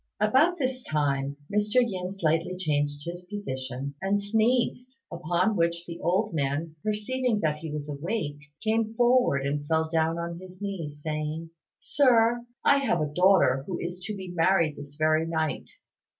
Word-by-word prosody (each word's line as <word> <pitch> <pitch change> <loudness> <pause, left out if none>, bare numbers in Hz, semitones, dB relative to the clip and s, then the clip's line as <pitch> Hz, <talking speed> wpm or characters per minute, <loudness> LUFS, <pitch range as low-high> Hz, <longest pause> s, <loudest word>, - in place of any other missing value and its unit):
About 265 - +4
this 260 -3 -1
time 140 - -1 0.2
Mr. 210 +1 +1
Yin 195 -8 +2
slightly 180 -1 0
changed 145 -4 -1
his 175 +1 -6
position, 135 -8 -5
and 195 +1 +1
sneezed; 240 +4 +1
upon 175 +5 0
which 170 -1 0
the 170 -1 -7
old 190 +3 +1
man, 155 +2 -1
perceiving 215 +2 0
that 150 -1 +1
he 160 0 -7
was 150 -1 -4
awake, 145 +1 -3 0.2
came 225 0 0
forward 240 - +3
and 145 +1 -2
fell 160 0 +1
down 165 0 +1
on 170 0 -4
his 185 0 -12
knees, 165 -8 -5
saying, 155 +1 -3 0.3
"Sir, 240 -4 +3 0.2
I 280 - +6
have 255 -11 +1
a 150 -1 -2
daughter 180 -7 +4
who 180 - -3
is 175 +1 -4
to 210 - -4
be 190 -2 -7
married 170 -3 +2
this 145 0 -10
very 155 +1 +2
night. 160 -2 -2
170 Hz, 160 wpm, -27 LUFS, 155-210 Hz, 0.3 s, I